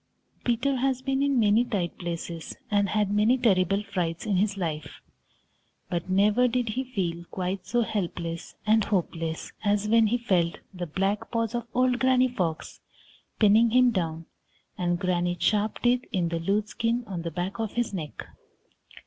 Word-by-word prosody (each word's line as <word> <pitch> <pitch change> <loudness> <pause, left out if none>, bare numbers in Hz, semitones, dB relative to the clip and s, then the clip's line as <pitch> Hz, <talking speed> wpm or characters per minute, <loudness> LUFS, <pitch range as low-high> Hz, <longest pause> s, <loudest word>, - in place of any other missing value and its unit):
Peter 250 +3 +1
has 260 0 0
been 270 0 0
in 280 -2 +2
many 215 +1 +4
tight 195 -8 -2
places 170 -1 -5
and 200 -1 +2
had 210 -1 +1
many 215 +5 +4
terrible 195 -4 +2
frights 175 -5 -3
in 200 -3 +1
his 200 +1 +1
life, 160 -5 -4 0.9
but 175 +1 -2
never 205 +6 +4
did 245 -1 0
he 250 +5 -1
feel 180 -9 -3
quite 185 +2 -4
so 240 0 +2
helpless 170 -5 -4
and 215 -1 +4
hopeless 165 -4 -2
as 205 0 +1
when 225 0 +5
he 240 +3 +1
felt 180 -8 +1 0.2
the 180 -1 -5
black 195 +6 -1
paws 230 -1 -1
of 235 -1 -3
old 250 0 +2
Granny 260 0 +4
Fox 180 -10 -3 0.6
pinning 220 +2 +5
him 250 +1 +5
down 165 -5 -2 0.5
and 175 -1 0
Granny's 175 -1 0
sharp 210 +2 +2
teeth 245 +1 +3
in 180 -5 0
the 165 0 -2
loose 205 +5 0
skin 230 +3 -1
on 185 -5 -5
the 170 - -3
back 180 +6 -4
of 220 -2 -2
his 240 -3 -1
neck. 155 -6 -5
205 Hz, 165 wpm, -27 LUFS, 175-235 Hz, 0.9 s, when